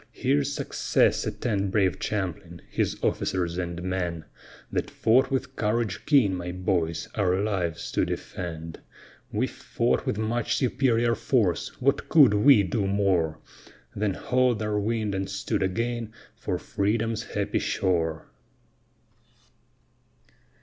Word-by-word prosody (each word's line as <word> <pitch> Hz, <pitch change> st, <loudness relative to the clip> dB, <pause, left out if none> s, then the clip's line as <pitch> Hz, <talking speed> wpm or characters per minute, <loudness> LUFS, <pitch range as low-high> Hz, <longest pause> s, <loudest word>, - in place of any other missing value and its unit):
Here's 70 Hz, -1 st, +1 dB
success -, -, +1 dB
attend 100 Hz, -5 st, -1 dB
brave 95 Hz, -2 st, +1 dB
Champlin, 90 Hz, -4 st, -4 dB
his -, -, 0 dB
officers 90 Hz, -1 st, 0 dB
and 85 Hz, -1 st, -4 dB
men, 90 Hz, -3 st, -2 dB, 0.5 s
That -, -, -1 dB
fought 130 Hz, +4 st, +3 dB
with 135 Hz, -1 st, -2 dB
courage 105 Hz, -1 st, -1 dB
keen, 130 Hz, -10 st, +4 dB
my 90 Hz, -1 st, -4 dB
boys, 90 Hz, -1 st, -1 dB
our 95 Hz, -3 st, +1 dB
lives 95 Hz, -6 st, -2 dB
to -, -, +1 dB
defend; 85 Hz, -2 st, -5 dB, 0.5 s
We -, -, +1 dB
fought -, -, -1 dB
with -, -, 0 dB
much 110 Hz, +2 st, 0 dB
superior 120 Hz, -3 st, +2 dB
force, 110 Hz, -5 st, 0 dB
what 135 Hz, +2 st, +1 dB
could 145 Hz, -9 st, +7 dB
we 105 Hz, +1 st, +6 dB
do 100 Hz, +2 st, -1 dB
more? 95 Hz, -6 st, +1 dB, 0.6 s
Then 100 Hz, -2 st, 0 dB
haul'd 125 Hz, -3 st, +1 dB
our 105 Hz, -1 st, 0 dB
wind 110 Hz, 0 st, -1 dB
and 95 Hz, 0 st, -2 dB
stood 100 Hz, 0 st, -2 dB
again 115 Hz, +4 st, -2 dB, 0.2 s
for -, -, -3 dB
Freedom's 110 Hz, +2 st, -1 dB
happy 100 Hz, -3 st, -2 dB
shore. 80 Hz, -4 st, 0 dB
100 Hz, 120 wpm, -26 LUFS, 90-115 Hz, 0.6 s, could